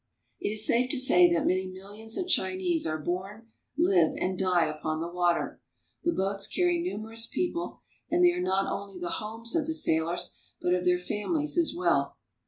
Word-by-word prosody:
It -, -, -2 dB
is 215 Hz, +1 st, +2 dB
safe 250 Hz, +2 st, +2 dB
to 285 Hz, -, +1 dB
say 180 Hz, -9 st, +6 dB
that 170 Hz, -, +1 dB
many 185 Hz, +1 st, +1 dB
millions 205 Hz, +4 st, -7 dB
of 365 Hz, -, -2 dB
Chinese 185 Hz, -, +1 dB
are 155 Hz, 0 st, -1 dB
born, 195 Hz, +8 st, -5 dB, 0.3 s
live, 185 Hz, -, +3 dB
and 185 Hz, 0 st, -1 dB
die 180 Hz, -2 st, +2 dB
upon 155 Hz, +1 st, -3 dB
the 165 Hz, -, -3 dB
water. 175 Hz, -1 st, 0 dB, 0.4 s
The 345 Hz, -, +2 dB
boats 195 Hz, -, 0 dB
carry 355 Hz, -1 st, +1 dB
numerous 225 Hz, -, -2 dB
people, 345 Hz, -1 st, -3 dB, 0.3 s
and 355 Hz, +1 st, +4 dB
they 350 Hz, -, +6 dB
are 360 Hz, +1 st, -3 dB
not 195 Hz, -, +1 dB
only 200 Hz, -1 st, -5 dB
the 175 Hz, -1 st, -3 dB
homes 225 Hz, +4 st, -4 dB
of 320 Hz, -3 st, +1 dB
the 320 Hz, -, -1 dB
sailors, 170 Hz, -, +1 dB, 0.2 s
but 180 Hz, -, +1 dB
of 180 Hz, 0 st, 0 dB
their 180 Hz, 0 st, +4 dB
families 295 Hz, -, -1 dB
as 335 Hz, -2 st, +2 dB
well. 365 Hz, -, +1 dB
195 Hz, 190 wpm, -28 LUFS, 180-270 Hz, 0.4 s, say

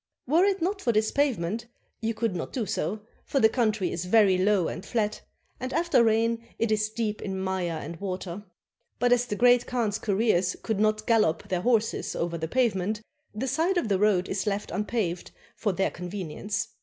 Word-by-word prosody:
Were 325 Hz, +8 st, +4 dB
it 390 Hz, -4 st, +1 dB
not 390 Hz, +3 st, -1 dB
for 240 Hz, -, +2 dB
this 215 Hz, 0 st, +1 dB
pavement, 235 Hz, -6 st, 0 dB, 0.3 s
you 225 Hz, 0 st, -1 dB
could 220 Hz, -4 st, -1 dB
not 165 Hz, -, -4 dB
do 245 Hz, -5 st, -2 dB
so, 205 Hz, 0 st, -2 dB, 0.2 s
for 275 Hz, -, 0 dB
the 220 Hz, -, +7 dB
country 215 Hz, -6 st, 0 dB
is 170 Hz, +1 st, -3 dB
very 200 Hz, -1 st, +5 dB
low 185 Hz, -1 st, +2 dB
and 180 Hz, -, -5 dB
flat, 215 Hz, -1 st, -1 dB, 0.4 s
and 255 Hz, 0 st, -4 dB
after 330 Hz, -4 st, +3 dB
rain 230 Hz, +1 st, +2 dB
it 230 Hz, -1 st, 0 dB
is 215 Hz, 0 st, +1 dB
deep 215 Hz, -1 st, -3 dB
in 190 Hz, -1 st, -3 dB
mire 185 Hz, -3 st, -2 dB
and 165 Hz, +3 st, -7 dB
water. 185 Hz, 0 st, -4 dB, 0.5 s
But 245 Hz, +1 st, +4 dB
as 245 Hz, 0 st, +1 dB
the 210 Hz, -, -2 dB
Great 245 Hz, +1 st, +4 dB
Khan's 225 Hz, -4 st, -1 dB
couriers 200 Hz, -3 st, +1 dB
could 220 Hz, -3 st, -1 dB
not 215 Hz, 0 st, +1 dB
gallop 215 Hz, -9 st, +2 dB
their 180 Hz, -2 st, 0 dB
horses 225 Hz, 0 st, +1 dB
over 170 Hz, 0 st, -2 dB
the 160 Hz, -1 st, -3 dB
pavement, 215 Hz, -2 st, 0 dB, 0.3 s
the 250 Hz, +5 st, -2 dB
side 325 Hz, +8 st, +1 dB
of 235 Hz, -, 0 dB
the 195 Hz, -2 st, +2 dB
road 195 Hz, -3 st, +3 dB
is 200 Hz, +2 st, -2 dB
left 205 Hz, 0 st, -2 dB
unpaved 210 Hz, -5 st, -2 dB, 0.3 s
for 210 Hz, -, 0 dB
their 190 Hz, +1 st, 0 dB
convenience. 180 Hz, +3 st, -4 dB
215 Hz, 195 wpm, -27 LUFS, 190-235 Hz, 0.5 s, the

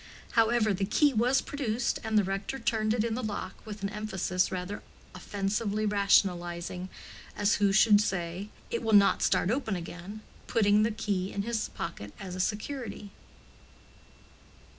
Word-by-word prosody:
However, 225 Hz, -2 st, +3 dB
the 195 Hz, -, -2 dB
key 280 Hz, +8 st, +3 dB
was 245 Hz, +4 st, +3 dB
produced, 245 Hz, -4 st, -1 dB
and 220 Hz, -1 st, +1 dB
the 210 Hz, -, +5 dB
rector 195 Hz, +6 st, -3 dB
turned 220 Hz, -4 st, 0 dB
it 220 Hz, -, +1 dB
in 230 Hz, -1 st, -1 dB
the 250 Hz, -, -2 dB
lock 205 Hz, -4 st, -5 dB
with 210 Hz, -1 st, -7 dB
an 195 Hz, -, 0 dB
emphasis 190 Hz, -3 st, -1 dB
rather 185 Hz, +2 st, -4 dB, 0.3 s
offensively 205 Hz, +1 st, -2 dB
rationalizing—as 185 Hz, 0 st, 0 dB
who 200 Hz, -1 st, +3 dB
should 205 Hz, +1 st, +6 dB
say, 185 Hz, 0 st, -3 dB, 0.2 s
"it 235 Hz, -, -1 dB
will 225 Hz, -1 st, 0 dB
not 200 Hz, -1 st, +6 dB
start 185 Hz, -, +2 dB
open 230 Hz, -5 st, -1 dB
again"—putting 205 Hz, +4 st, -1 dB
the 215 Hz, -, +3 dB
key 200 Hz, -4 st, -2 dB
in 200 Hz, -, -2 dB
his 230 Hz, -1 st, -2 dB
pocket 105 Hz, -12 st, -6 dB
as 190 Hz, -2 st, -6 dB
a 185 Hz, -, -6 dB
security. 210 Hz, 0 st, -3 dB
205 Hz, 145 wpm, -29 LUFS, 190-220 Hz, 0.3 s, should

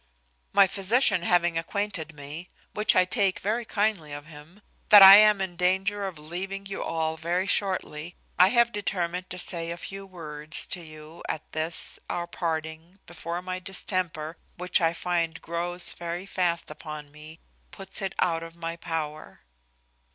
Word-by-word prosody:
"My 200 Hz, -, +6 dB
physician 200 Hz, +1 st, +2 dB
having 175 Hz, -1 st, +2 dB
acquainted 165 Hz, -3 st, -3 dB
me 150 Hz, +5 st, -8 dB, 0.3 s
(which 210 Hz, 0 st, +2 dB
I 185 Hz, -, +5 dB
take 195 Hz, -1 st, +1 dB
very 225 Hz, +4 st, -2 dB
kindly 205 Hz, -9 st, -1 dB
of 145 Hz, 0 st, -7 dB
him) 160 Hz, +6 st, -15 dB, 0.3 s
that 205 Hz, -2 st, +10 dB
I 195 Hz, +1 st, +12 dB
am 210 Hz, -1 st, +6 dB
in 190 Hz, -2 st, -3 dB
danger 190 Hz, +3 st, +1 dB
of 185 Hz, -4 st, -7 dB
leaving 185 Hz, +6 st, -6 dB
you 195 Hz, 0 st, -5 dB
all 160 Hz, -1 st, -2 dB
very 175 Hz, +3 st, -1 dB
shortly, 180 Hz, -5 st, 0 dB, 0.2 s
I 180 Hz, -, +8 dB
have 235 Hz, +2 st, +3 dB
determined 180 Hz, -3 st, -2 dB
to 180 Hz, -, -6 dB
say 170 Hz, -2 st, 0 dB
a 170 Hz, -, -4 dB
few 195 Hz, +2 st, -8 dB
words 155 Hz, -4 st, -3 dB
to 180 Hz, -, -3 dB
you 155 Hz, 0 st, -12 dB
at 155 Hz, -1 st, -5 dB
this 160 Hz, +1 st, -2 dB
our 175 Hz, -, -2 dB
parting, 160 Hz, +1 st, -4 dB
before 170 Hz, +1 st, -6 dB
my 185 Hz, 0 st, -4 dB
distemper, 180 Hz, -4 st, -2 dB, 0.2 s
which 180 Hz, +1 st, +1 dB
I 165 Hz, 0 st, +2 dB
find 170 Hz, -2 st, -2 dB
grows 175 Hz, +1 st, -1 dB
very 175 Hz, +2 st, -5 dB
fast 175 Hz, -5 st, -1 dB
upon 150 Hz, -1 st, -9 dB
me, 155 Hz, +2 st, -12 dB, 0.3 s
puts 195 Hz, +1 st, -5 dB
it 195 Hz, -1 st, -3 dB
out 165 Hz, -2 st, +1 dB
of 165 Hz, 0 st, -10 dB
my 165 Hz, 0 st, -5 dB
power. 155 Hz, -, -5 dB
175 Hz, 160 wpm, -26 LUFS, 160-195 Hz, 0.3 s, I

